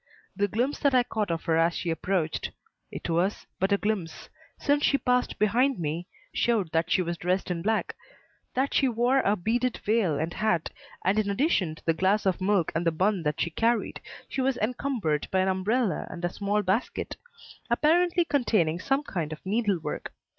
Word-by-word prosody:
The 205 +1 +1
glimpse 245 +8 -1
that 280 -3 +3
I 250 - +5
caught 215 -4 -2
of 165 -1 -2
her 165 -2 +1
as 165 +1 +3
she 170 - -2
approached 165 -1 -1 0.4
it - - -6
was 175 +4 0
but 190 +2 +1
a 200 - +4
glimpse, 200 -6 -3 0.3
since 290 +1 +1
she 280 - +4
passed 250 -1 0
behind 240 +6 +2
me 165 +2 -3 0.3
showed 215 -9 +1
that 165 +1 +1
she 185 - +3
was 170 -1 -4
dressed 185 +1 0
in 170 -1 -2
black, 220 +4 0 0.6
that 265 +2 +1
she 270 - +3
wore 245 +3 +2
a 205 -5 +2
beaded 230 +6 0
veil 205 -8 +2
and 160 +3 -2
hat, 215 -7 0 0.3
and 195 +4 +3
in 205 -1 0
addition 200 - +1
to - - -18
the 165 - +3
glass 190 +6 +1
of 190 0 +1
milk 190 -3 +2
and 165 - 0
the 165 - +2
bun 190 +4 +1
that 150 -2 -2
she 170 - 0
carried, 230 +5 0 0.3
she 265 - -2
was 260 -1 +1
encumbered 225 - -1
by 190 - +2
an 190 - +1
umbrella 190 +1 0
and 175 - -4
a 175 - -2
small 205 +1 0
basket, 195 +6 -1 0.5
apparently 340 +7 +3
containing 210 - +1
some 275 +8 0
kind 170 - -3
of 155 - -8
needlework. 195 -7 -1
200 Hz, 190 wpm, -27 LUFS, 170-240 Hz, 0.6 s, I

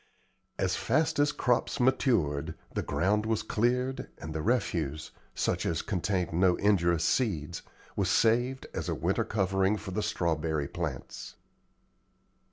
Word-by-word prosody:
As 95 -1 0
fast 160 -1 +1
as 145 0 +4
crops 125 -4 0
matured, 120 - +1 0.2
the - - -1
ground 105 +4 0
was 110 -1 0
cleared, 125 +4 0
and 80 +1 -7
the 80 - -2
refuse, 80 - -1 0.2
such - - 0
as 80 - -1
contained 90 -2 -1
no 90 +1 +4
injurious 85 -5 +2
seeds, 85 - 0 0.3
was - - 0
saved 120 +4 +2
as - - -3
a - - 0
winter - - 0
covering 95 0 +1
for 100 -1 -7
the 105 - -1
strawberry 80 -6 -1
plants. 80 -7 -5
95 Hz, 135 wpm, -29 LUFS, 85-120 Hz, 0.3 s, as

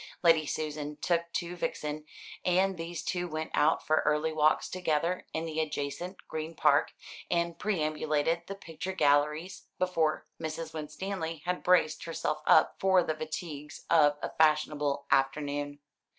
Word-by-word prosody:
Lady 165 -3 +5
Susan 150 -1 -3
took 170 +2 0
to 175 +1 -3
Vixen; 150 -3 -3 0.4
and 185 +2 +2
these 165 0 -5
two 180 -1 -2
went 155 -1 -4
out 155 +2 +3
for 155 - +3
early 150 +1 +1
walks 155 0 +3
together 175 0 -1
in 160 +1 -2
the 160 -1 -3
adjacent 155 +4 -4
Green 160 +1 -5
Park, - - +3 0.4
and 170 -1 0
perambulated 155 -3 0
the 195 - -5
picture 185 0 -6
galleries, 150 +3 +1
before 165 -4 +1 0.2
Mrs. 160 0 -4
Winstanley 160 +1 -4
had 180 0 -1
braced 175 -4 +3
herself 155 -2 -2
up - - +5
for 190 -2 +4
the 155 - -1
fatigues 155 -1 -6
of 145 -3 +5
a - - -2
fashionable 150 -2 +2
afternoon. 145 +1 +1
155 Hz, 140 wpm, -30 LUFS, 150-170 Hz, 0.4 s, Lady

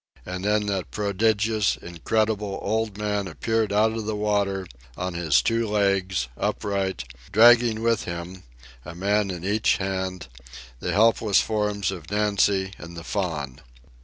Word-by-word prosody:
And 90 +1 -5
then 105 +1 +1
that 95 -8 -2
prodigious, 105 - +1
incredible 105 +3 -1
old 110 -2 -1
man 105 -2 -1
appeared 110 +6 -1
out 105 +2 +3
of 110 -1 -4
the 110 - -1
water, 100 -2 0 0.3
on 90 0 -3
his 80 -8 +2
two 115 0 +1
legs, 100 - +1
upright, 95 -8 -2 0.3
dragging 115 +1 +6
with 115 -2 +1
him, 85 +2 -6 0.4
a 85 - -9
man 100 +3 +1
in 90 -1 -5
each 105 +2 +2
hand, 95 -4 -3 0.5
the - - -2
helpless 110 -1 +4
forms 105 -3 -1
of 85 -5 -8
Nancy 100 -2 +1
and 85 0 -10
the 85 - -7
Faun. 80 -10 -3
100 Hz, 140 wpm, -24 LUFS, 90-105 Hz, 0.5 s, dragging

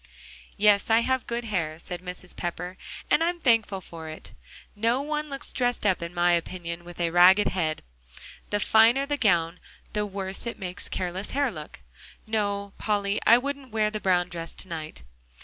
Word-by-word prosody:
"Yes, 205 0 +4
I 225 +1 +5
have 260 0 0
good 235 0 -2
hair," 165 -8 -2
said 175 +1 -7
Mrs. 180 0 -8
Pepper, 180 +1 -4 0.4
"and 300 +2 +5
I'm 345 +1 0
thankful 225 - +2
for 165 -3 -9
it. 155 - -9 0.4
No 230 +4 +2
one 300 0 -2
looks 275 -1 -6
dressed 245 -3 0
up, 190 -4 +2
in 170 0 -4
my 175 0 +3
opinion, 170 0 -2
with 175 0 -11
a 170 -1 +1
ragged 185 +4 +6
head. 160 -4 -1 0.7
The 205 - 0
finer 225 +6 +5
the 290 0 -1
gown, 175 -7 +2 0.3
the 210 0 0
worse 195 +2 -4
it 235 - -4
makes 185 0 -6
careless 185 +2 -3
hair 285 -3 +2
look. 150 - -9 0.4
No, 200 -2 -1
Polly, 205 -1 0
I 230 - +9
wouldn't 275 0 -4
wear 215 -1 +2
the 215 - -3
brown 180 -3 +2
dress 165 -1 -7
to - - -7
night." 155 - -7
200 Hz, 180 wpm, -26 LUFS, 175-230 Hz, 0.7 s, I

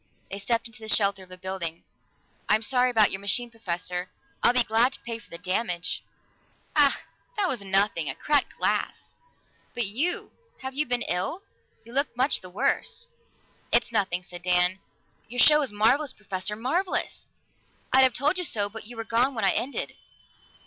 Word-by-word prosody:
They 200 - -4
stepped 230 +3 0
into 230 0 -11
the 220 - -8
shelter 200 -2 +4
of 185 - -13
a 185 - -10
building. 180 -3 -3 0.7
"I'm 215 +1 +4
sorry 250 +2 +3
about 220 -4 +4
your 190 - -4
machine, 235 +4 +1
Professor. 180 -4 -4 0.3
I'd 240 - +4
be 250 - +6
glad 230 +4 +2
to - - -8
pay 230 -1 -6
for - - -19
the 170 - -5
damage." 180 -1 -1 0.7
"Ach, 290 -2 +5 0.4
that 400 -2 +2
was 255 - -1
nothing 195 -5 +1
a 135 - -3
cracked 290 -2 0
glass. - - -2 0.6
But 240 - +1
you 265 - -1 0.3
have 265 0 -5
you 300 +3 0
been 245 0 +1
ill? 245 - -1 0.4
You 235 +1 -13
look 275 -2 0
much 260 +3 +2
the 185 - -10
worse." 475 - -1 0.6
"It's - - +3
nothing," 190 -5 0
said 175 0 -9
Dan. 180 +1 +2 0.5
"Your 245 +2 -5
show 300 +4 +7
was 280 -7 -1
marvelous, 250 +7 +2
Professor 200 0 -4
marvelous! 330 - -1 0.7
I'd 265 - +7
have 260 -2 +5
told 295 +9 +2
you - - -1
so, 205 -10 +1
but 220 0 -8
you 240 0 -10
were 225 - -3
gone 240 +4 +1
when 220 -3 0
it - - +5
ended." 270 +3 -2
225 Hz, 180 wpm, -26 LUFS, 190-255 Hz, 0.7 s, show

